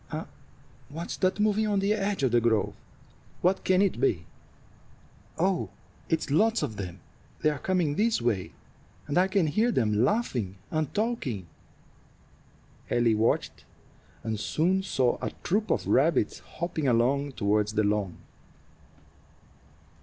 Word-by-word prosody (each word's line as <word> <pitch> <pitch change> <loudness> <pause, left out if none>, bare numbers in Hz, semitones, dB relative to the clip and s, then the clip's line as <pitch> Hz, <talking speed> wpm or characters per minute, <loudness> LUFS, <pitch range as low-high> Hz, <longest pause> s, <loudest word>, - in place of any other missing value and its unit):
What's 165 +4 -5
that 185 +1 +1
moving 215 +1 +2
on 205 -1 +1
the 200 +2 +2
edge 200 -6 -1
of 130 - +3
the 120 0 +4
grove? 110 -3 +1 0.7
What 185 +2 +2
can 185 +1 +4
it 185 -11 0
be? 90 - +1 1.1
Oh, 185 +1 +1 0.4
it's 160 -3 0
lots 225 +9 +3
of 110 - -4
them! 90 -2 -6 0.4
They 155 - +4
are 145 - -5
coming 180 -6 +1
this 220 +7 +2
way, 115 -6 -1 0.5
and 145 - -3
I 180 +2 +4
can 195 -3 +2
hear 215 +11 +2
them 110 - +1
laughing 125 - 0 0.2
and 155 -2 -1
talking." 205 - -1 1.4
Ellie 120 -2 +3
watched, 110 +1 0 0.6
and 110 -2 -2
soon 180 - +1
saw 130 -10 +1
a - - -1
troop 210 +4 0
of - - 0
rabbits - - +2
hopping 170 -4 -4
along 135 +4 +2
toward 105 -1 +1
the 110 0 0
lawn. 100 -3 0
150 Hz, 135 wpm, -28 LUFS, -, 1.4 s, the